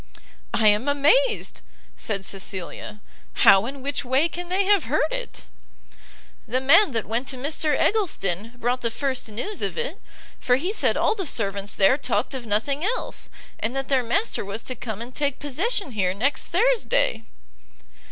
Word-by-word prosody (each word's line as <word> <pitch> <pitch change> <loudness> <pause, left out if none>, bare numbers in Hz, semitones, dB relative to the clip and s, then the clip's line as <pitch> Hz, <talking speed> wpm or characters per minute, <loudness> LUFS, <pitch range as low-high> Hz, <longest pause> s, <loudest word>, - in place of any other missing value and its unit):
"I 220 - +3
am 210 +6 +1
amazed!" 370 - +2 0.3
said 200 -3 -3
Cecilia; 195 +2 -5 0.4
"how 195 +3 +7
and 270 0 -7
which 280 +1 -2
way 265 +5 +2
can 350 +1 -6
they 380 +2 +2
have 400 -4 +3
heard 305 +5 +1
it?" - - -5 1.0
"The 250 +4 0
man 285 +8 +5
that 225 -2 -1
went 235 +4 -2
to 260 - -3
Mr 295 +2 0
Eggleston 230 - 0
brought 245 +1 -1
the 230 - 0
first 260 0 -2
news 250 - -5
of - - -2
it, 475 +1 -4 0.4
for 250 - +3
he 350 +10 -2
said - - +1
all - - +2
the 390 -6 -3
servants 200 -4 -1
there 205 +8 +4
talked 240 -3 -1
of 250 -3 -6
nothing 275 +8 0
else, 455 +6 -2 0.3
and 230 +4 -2
that 270 0 -3
their 265 -2 +3
master 250 - 0
was 200 +3 -6
to 255 - -3
come 220 -1 -5
and 245 +2 -11
take 285 -1 -1
possession 340 - -1
here 190 -4 0
next 265 +6 0
Thursday." 470 - +2
265 Hz, 170 wpm, -24 LUFS, 220-335 Hz, 1.0 s, how